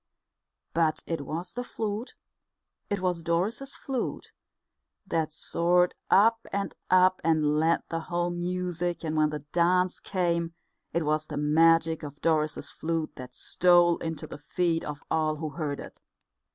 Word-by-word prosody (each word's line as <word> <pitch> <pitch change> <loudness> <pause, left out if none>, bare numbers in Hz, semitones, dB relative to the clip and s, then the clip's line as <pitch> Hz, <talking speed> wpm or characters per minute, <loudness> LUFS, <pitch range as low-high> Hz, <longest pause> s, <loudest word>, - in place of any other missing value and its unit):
But 160 -1 +1
it 165 -3 -2
was 170 +3 -4
the 245 - -3
flute, 220 0 -4 0.7
it 200 -2 -1
was 180 -2 0
Doris's 205 +12 -1
flute, 265 -3 -4 0.7
that 160 -4 -1
soared 175 +3 +2 0.2
up 225 +3 +5
and 200 0 -2 0.2
up 185 0 +5
and 155 -2 +2
led 165 +1 +2
the 165 - -1
whole 175 +1 -1
music; 175 -1 -2
and 155 0 -2
when 155 -1 +3
the 150 -1 -6
dance 180 +1 +2
came, 170 -3 -1 0.4
it 170 -2 0
was 155 +1 0
the 150 - -5
magic 160 +2 +4
of 145 -1 -8
Doris's 155 -2 0
flute 165 -1 -2
that 125 -1 -9
stole 175 -1 +4
into 160 -2 -4
the - - -9
feet 165 +2 0
of 150 -1 -6
all 155 -1 +1
who 155 0 -4
heard 145 -2 -3
it. - - -10
170 Hz, 150 wpm, -28 LUFS, 155-180 Hz, 0.7 s, up